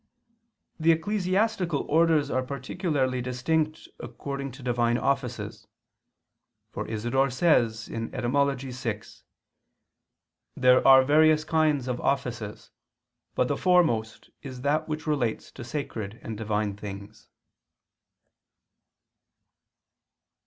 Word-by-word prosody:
The 160 +1 +4
ecclesiastical 185 -1 0
orders 155 -2 +3
are 130 - +1
particularly 130 0 -2
distinct 155 +5 -1
according 140 -1 -6
to 135 0 -12
divine 120 -1 +1
offices. 130 -3 -2 1.0
For - - -5
Isidore 120 +5 0
says 120 -6 +2
(Etym. 125 +2 -2
vi): 105 -1 -4 1.6
"There 125 0 +5
are 135 0 +8
various 155 +2 +4
kinds 155 -4 +1
of 125 -1 -3
offices; 120 -6 -3 0.6
but 125 - +2
the 145 - 0
foremost 135 -13 +1
is 130 -3 -8
that 145 +3 0
which 155 0 -4
relates 135 -8 -1
to 125 - -9
sacred 115 -5 -5
and 110 - -5
Divine 105 -1 -2
things." 100 +1 -10
130 Hz, 95 wpm, -26 LUFS, 120-155 Hz, 1.6 s, are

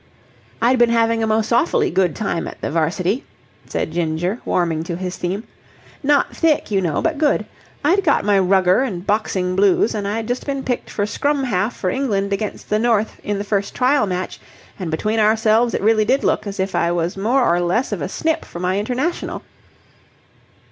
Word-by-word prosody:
I'd 250 +2 +4
been 240 -1 +5
having 230 -1 +2
a 220 - +1
most 220 0 0
awfully 380 - +2
good 185 -4 +1
time 195 -6 -2
at - - -9
the - - -3
'varsity,'" 175 - 0 0.4
said - - -3
Ginger, 170 +5 -1
warming 165 -3 0
to 170 - -3
his 180 +1 -4
theme. 190 +4 -3 0.6
"Not 290 0 +2
thick, 315 -8 +1
you 195 -1 +2
know, 170 -5 -1
but 320 -3 0
good. 300 -2 +2 0.4
I'd 380 +6 +3
got 290 - +2
my 205 -1 +4
rugger 190 +1 +3
and 195 -9 -3
boxing 190 -3 0
blues 200 +2 +3
and 205 -2 -3
I'd 220 +2 -2
just 245 +1 -2
been 275 -1 -2
picked 245 -2 -3
for 205 - -1
scrum 285 +7 0
half 215 -2 0
for 185 - -1
England 200 -7 -1
against 210 +1 -4
the 210 - +3
North 225 -2 +1
in 205 -1 -2
the 200 - -3
first 200 -1 -2
trial 255 -3 +2
match, 185 0 -4 0.4
and 180 -4 -3
between 215 +8 -1
ourselves 220 +2 +3
it - - -2
really 215 0 +4
did 265 +5 +2
look - - 0
as 200 -1 -6
if 190 +1 -1
I 170 - +1
was 175 0 -1
more 240 +6 +2
or 175 +1 +2
less 185 +9 0
of 200 -6 -3
a 165 - -3
snip 320 +8 -1
for - - -10
my 185 +2 0
international." 255 +10 -2
210 Hz, 195 wpm, -20 LUFS, 185-245 Hz, 0.6 s, been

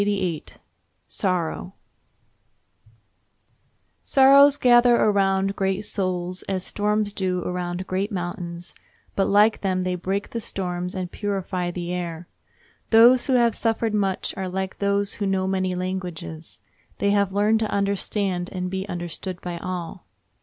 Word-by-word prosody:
] 205 - +1 1.0
Sorrows 180 -1 -2 2.8
gather 240 -1 +6
around 195 -2 +2
great 190 -1 0
souls 185 -3 -1
as 185 -2 -1
storms 210 0 0
do 185 -3 -1
around 180 0 -3
great 190 +3 -2
mountains, 175 -2 -5 0.4
but, 195 - +2
like 210 +2 +4
them, 185 -2 0
they 180 0 -1
break 190 +3 -3
the 230 - -3
storms 180 -3 -3
and 185 -1 -4
purify 190 -3 -2
the 175 0 -4
air. 170 -1 -5 0.6
Those 240 +3 +6
who 265 - +2
have 235 -2 +4
suffered 225 -1 0
much 195 -3 0
are 190 -1 -4
like 190 +1 -4
those 200 0 +1
who 200 - +1
know 190 -1 0
many 185 -1 -1
languages—they 180 +1 -5
have 200 -1 +2
learned 210 +3 +2
to 220 -1 -1
understand 200 -2 -1
and 180 -1 -4
be 190 +1 -4
understood 175 +1 -5
by 175 -1 -5
all. 180 -2 -6
190 Hz, 130 wpm, -24 LUFS, 180-205 Hz, 2.8 s, gather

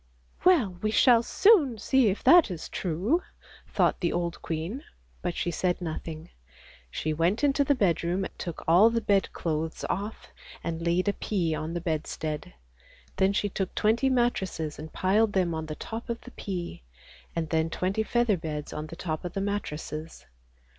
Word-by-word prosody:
" - - -30
Well 240 - +4
we 215 - +1
shall 230 +1 +5
soon 310 - +4
see 260 +1 +3
if 195 - -3
that 345 -7 +7
is 175 -4 -6
true," 195 - 0 0.5
thought - - +1
the 175 - 0
old 170 -1 -2
queen, 170 - -4 0.4
but 175 -1 -2
she 175 - -1
said 180 +1 0
nothing. 160 -1 -6 0.6
She 155 - -2
went 170 - +1
into 285 0 +3
the 285 +1 +2
bedroom, 180 -3 +1
took 170 -3 -5
all 180 +7 +7
the 230 0 0
bedclothes 165 -6 -1
off 205 +3 -5 0.3
and 165 0 -3
laid 175 +3 +1
a 205 - +3
pea 175 -8 -1
on 155 +2 -4
the 175 - -2
bedstead: 155 - -3 0.6
then 190 +1 +3
she 205 0 0
took 190 -1 -3
twenty 230 +5 +2
mattresses 190 - 0
and 155 +1 -8
piled 205 +3 +2
them 180 -3 +1
on 160 0 -4
the 155 - -5
top 225 +7 -7
of 235 - -3
the 250 - -12
pea, 175 - -5 0.5
and 165 -2 -2
then 160 0 +1
twenty 185 +5 -1
feather 235 -2 +2
beds 150 -2 -5
on 155 +1 -5
the 165 - -9
top 160 -3 -4
of 180 0 -5
the 195 - -2
mattresses. 160 - -4
180 Hz, 175 wpm, -27 LUFS, 160-220 Hz, 0.6 s, that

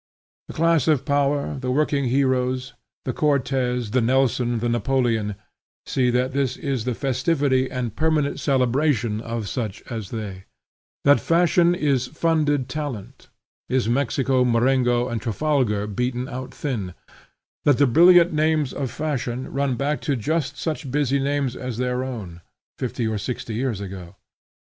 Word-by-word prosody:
The - - -9
class 165 -3 +2
of 150 -5 +2
power, 145 -1 0
the 130 -1 -3
working 140 +1 +1
heroes, 130 0 0 0.3
the 130 - -1
Cortez, 130 -5 0
the 130 +2 +2
Nelson, 125 -1 +2
the 115 +2 -1
Napoleon, 115 -3 0 0.5
see 125 -2 +1
that 125 +1 +1
this 135 -2 -1
is 135 -7 -2
the 125 -2 -1
festivity 135 0 +1
and 120 -4 -4
permanent 155 -1 +1
celebration 125 -4 +1
of 115 -2 -4
such 110 -3 -4
as 110 -5 -5
they; 100 -5 -6 0.6
that 145 0 +6
fashion 175 +1 +3
is 140 -6 +1
funded 150 -4 +1
talent; 145 -10 -6 0.4
is 130 -2 +1
Mexico, 130 +1 +1
Marengo, 120 0 +2
and 120 -3 -3
Trafalgar 120 -3 0
beaten 125 +4 -2
out 130 -1 -6
thin; 105 - -4 0.7
that 145 -4 +5
the 145 - +5
brilliant 175 +6 +6
names 155 -2 +1
of 135 -3 -3
fashion 130 -2 -3
run 140 -2 0
back 140 +4 -1
to 140 - 0
just 150 +5 -1
such 155 -4 -3
busy 140 0 +1
names 140 -2 -1
as 125 -3 -5
their 125 0 -1
own, 100 -10 -7 0.4
fifty 125 -1 -2
or 110 -1 -2
sixty 115 +2 -4
years 115 -2 -2
ago. 95 -3 -8
130 Hz, 145 wpm, -23 LUFS, 120-145 Hz, 0.7 s, that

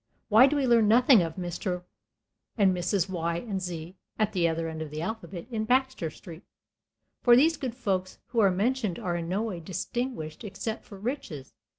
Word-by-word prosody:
Why 230 +5 +8
do 290 - 0
we 280 -2 +1
learn 235 -3 +5
nothing 240 0 +6
of 165 -2 -3
Mr. 180 0 -3 0.7
and 195 -3 +4
Mrs. 180 +1 0
Y. 170 -2 -2
and 195 -1 -4
Z., 175 -1 -6 0.2
at 215 -1 +1
the 175 -3 +2
other 165 0 -1
end 160 -1 -5
of 155 - -5
the 155 +2 -5
alphabet, 200 -3 -5
in 220 -2 -1
Baxter 255 -6 +1
Street? 165 +2 -11 0.8
For 240 -1 +7
these 315 +6 +5
good 260 -5 -4
folks 190 -6 -2
who 235 - 0
are 200 -3 +6
mentioned 210 +1 0
are 185 -7 -2
in 170 -1 -3
no 195 +4 0
way 205 -6 -4
distinguished 185 0 -4
except 215 +2 -5
for 200 - -11
riches. 195 - -5
195 Hz, 190 wpm, -28 LUFS, 170-235 Hz, 0.8 s, Why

